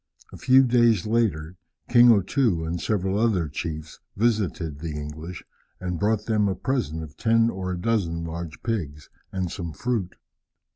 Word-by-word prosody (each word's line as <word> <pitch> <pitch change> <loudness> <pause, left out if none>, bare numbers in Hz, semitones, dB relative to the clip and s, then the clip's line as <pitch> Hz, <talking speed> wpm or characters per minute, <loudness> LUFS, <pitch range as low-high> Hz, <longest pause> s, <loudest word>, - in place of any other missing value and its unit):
A - - -8
few 130 +1 +5
days 120 -6 +3
later, 95 -7 0 0.3
King 120 0 +7
O 105 -3 +5
Too 95 -8 +1
and 85 +1 -3
several 95 -1 0
other 105 -8 +2
chiefs 75 +1 -6 0.2
visited 95 -9 0
the 80 0 -5
English, 80 +4 -7 0.4
and 90 -2 -3
brought 105 0 +1
them 105 -2 +2
a 95 - 0
present 115 - -2
of 75 -2 -11
ten 115 0 +3
or 95 -1 -4
a 90 - -3
dozen 90 -6 0
large 85 -1 -6
pigs 75 -11 -4 0.2
and 95 -2 -2
some 85 -4 -5
fruit. 105 - -2
95 Hz, 160 wpm, -25 LUFS, 80-115 Hz, 0.4 s, King